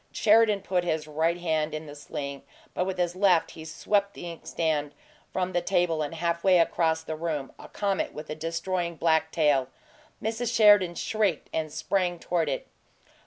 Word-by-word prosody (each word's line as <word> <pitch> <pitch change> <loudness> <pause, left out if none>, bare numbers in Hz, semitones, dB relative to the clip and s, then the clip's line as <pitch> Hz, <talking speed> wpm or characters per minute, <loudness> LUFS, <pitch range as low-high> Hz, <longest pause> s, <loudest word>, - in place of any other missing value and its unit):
Sheridan 215 -2 +4
put 180 -2 0
his 160 -3 -1
right 160 +3 0
hand 160 -3 -1
in 155 +1 -6
the 145 - -9
sling, 140 -1 -6 0.3
but 180 - 0
with 190 -1 -3
his 175 -1 0
left 185 -3 +3
he 160 - -10
swept 200 +5 -1
the 175 - -6
inkstand 155 -3 -2 0.4
from 185 0 -2
the 175 - +1
table 175 -3 +1
and 150 +2 -3
half 170 0 -1
way 185 -2 +5
across 160 -1 +2
the 160 -1 -4
room 155 -4 -3
a - - -10
comet 200 -2 -1
with 150 0 -8
a - - -4
destroying 170 +2 -2
black 160 0 +2
tail. 145 -5 +2 0.5
Mrs. 230 +2 -2
Sheridan 205 -5 +6
shrieked 205 -7 -1
and 155 -1 -2
sprang 180 +1 -1
toward 165 -2 -1
it. 135 - -3
170 Hz, 175 wpm, -27 LUFS, 155-185 Hz, 0.5 s, Sheridan